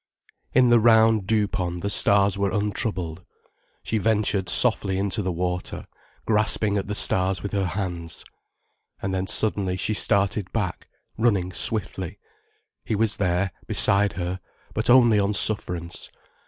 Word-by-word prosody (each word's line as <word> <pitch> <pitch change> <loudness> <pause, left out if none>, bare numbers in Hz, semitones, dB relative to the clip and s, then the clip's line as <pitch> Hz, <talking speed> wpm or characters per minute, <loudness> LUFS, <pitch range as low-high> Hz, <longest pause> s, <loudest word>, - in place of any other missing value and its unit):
In 125 -1 +4
the 120 0 +5
round 110 -3 +3
dew 105 -1 +1
pond 90 -4 -4
the 100 - -3
stars 100 -1 +3
were 100 0 -1
untroubled. 100 -5 -3 0.6
She 110 - -2
ventured 105 -3 0
softly 95 -1 +6
into 100 +2 -1
the 95 -2 -3
water, 90 +1 -5 0.4
grasping 105 -1 0
at 100 - -3
the 105 - -3
stars 95 -2 0
with 100 - -5
her 100 -2 -2
hands. 90 -3 -5 0.7
And 95 0 -4
then 95 0 -3
suddenly 100 -4 0
she 105 - -2
started 100 -2 0
back, 100 -5 -4 0.3
running 100 -6 0
swiftly. 95 -2 -3 0.7
He 110 - -3
was 110 +1 +1
there, 90 0 -1 0.2
beside 100 0 +4
her, 90 +1 -5 0.3
but - - -2
only 120 -4 +5
on 100 +1 -1
sufferance. 90 -5 0
100 Hz, 140 wpm, -23 LUFS, 90-105 Hz, 0.7 s, softly